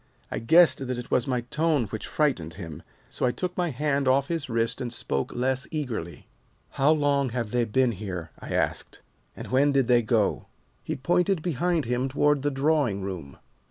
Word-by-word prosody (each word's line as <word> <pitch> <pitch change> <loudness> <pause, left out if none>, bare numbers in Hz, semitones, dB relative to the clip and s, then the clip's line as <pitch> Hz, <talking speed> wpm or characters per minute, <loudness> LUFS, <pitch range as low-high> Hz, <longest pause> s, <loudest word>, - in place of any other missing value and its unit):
"I - - -2
guessed 155 +1 +4
that 125 -1 -2
it 125 - -7
was 125 - +2
my 125 -2 0
tone 150 +3 +1
which 110 +1 -6
frightened 95 - 0
him, 80 -4 -8 0.3
so - - -6
I 125 - +3
took 180 +6 -4
my 175 -1 0
hand 140 0 0
off 135 +1 +3
his 165 -5 -2
wrist 115 0 0
and 120 -2 -3
spoke 70 -10 -2
less 130 +2 0
eagerly. 115 - -5 0.4
"'How 135 +2 +2
long 145 -3 +2
have 115 -3 -3
they 120 -1 +1
been 125 +3 +2
here?' 90 -6 -6
I - - -8
asked, - - -2 0.3
'and - - -7
when 140 +3 +4
did 135 -3 +2
they 120 -1 +5
go?' 110 -2 0 0.4
"He - - -3
pointed 175 +4 +1
behind 170 -1 0
him 125 +3 -1
toward 145 +1 +2
the 145 - +1
drawing 135 -8 +1
room. 90 -8 -6
130 Hz, 190 wpm, -26 LUFS, 115-145 Hz, 0.4 s, they